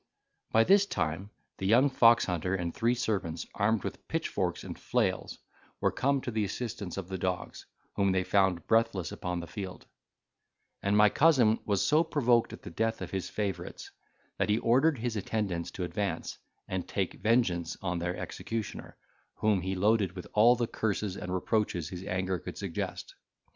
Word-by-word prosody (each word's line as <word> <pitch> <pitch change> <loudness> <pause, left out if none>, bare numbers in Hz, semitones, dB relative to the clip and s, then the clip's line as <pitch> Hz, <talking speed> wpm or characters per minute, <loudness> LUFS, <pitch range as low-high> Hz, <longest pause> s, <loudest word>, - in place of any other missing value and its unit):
By 115 - +5
this 200 - +5
time, 85 - -2 0.3
the 95 - -1
young 120 +7 +6
foxhunter 95 - +3
and 85 -1 -3
three 120 +2 +1
servants, 95 -9 -2
armed 105 0 +1
with - - -6
pitchforks - - -2
and - - -7
flails, - - -1 0.4
were - - +2
come 140 0 +1
to 125 - -4
the 110 -1 0
assistance 105 -3 -4
of 95 -3 -4
the 95 -1 -4
dogs, 90 0 -3 0.3
whom 100 -1 +2
they 95 0 +1
found 95 -3 +2
breathless 115 -5 +1
upon 90 -1 -3
the - - -6
field; 95 +2 -7 1.0
and 100 +1 +2
my 105 0 +7
cousin 125 -6 +4
was 100 -2 +1
so 155 +2 +4
provoked 125 -7 +2
at - - -10
the - - -8
death 115 0 -1
of - - -7
his 95 -2 -3
favourites, 100 -4 -4 0.5
that - - +1
he 105 - +3
ordered 130 +6 +3
his 120 0 -2
attendants 100 -4 -2
to 90 - -5
advance, 90 0 -3 0.3
and 95 -1 -3
take 95 -3 -3
vengeance 100 -8 +1
on 90 -2 -1
their 90 +1 -2
executioner, 115 -2 -5 0.4
whom 105 -3 +2
he 95 +2 -2
loaded 100 -1 +2
with 90 -2 -7
all 115 +3 +6
the 120 -1 0
curses 105 -3 -2
and 90 - -6
reproaches 90 -4 0
his 90 0 -7
anger 95 -1 -1
could - - -8
suggest. - - -4
100 Hz, 170 wpm, -30 LUFS, 90-115 Hz, 1.0 s, my